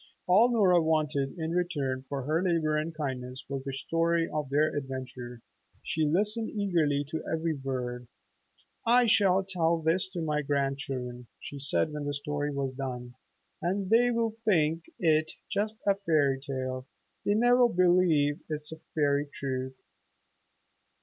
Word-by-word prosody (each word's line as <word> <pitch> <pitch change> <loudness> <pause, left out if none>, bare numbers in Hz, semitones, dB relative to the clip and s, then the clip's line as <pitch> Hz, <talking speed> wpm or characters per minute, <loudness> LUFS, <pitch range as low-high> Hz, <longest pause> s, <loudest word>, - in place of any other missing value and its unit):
All 200 +7 +5
Nora 190 -7 +4
wanted 155 -2 0
in 160 -1 -3
return 145 -7 -1
for 140 -2 -3
her 155 +5 +1
labor 165 -4 +1
and 155 +2 -1
kindness 130 -4 -5
was 135 -1 -4
the 135 - -4
story 165 +4 0
of 150 -3 -3
their 150 +3 +2
adventure. 130 -3 -6 0.4
She 160 -1 0
listened 210 +7 +1
eagerly 165 -9 +1
to 160 - -4
every 160 0 0
word. 125 -3 -4 0.8
"I 245 +2 +5
shall 195 -4 +4
tell 170 -3 +1
this 165 +4 0
to 175 - -3
my 150 -1 0
grandchildren," 135 -3 -2
she 140 - -8
said 145 +2 0
when 150 -1 -4
the 145 0 -2
story 145 0 -2
was 140 -2 -2
done, 125 -2 -5 0.5
"and 190 +3 -1
they 240 +2 +5
will 230 -2 0
think 165 -6 +2
it 155 -2 +2 0.2
just 215 +2 -1
a 200 - +5
fairy 155 -8 +1
tale. 130 -2 -4 0.4
They'll 205 - +2
never 245 +1 +5
believe 175 -6 +3
it's 150 0 -4 0.2
fairy 145 -1 +2
truth! 130 -1 -4
155 Hz, 145 wpm, -29 LUFS, 135-180 Hz, 0.8 s, All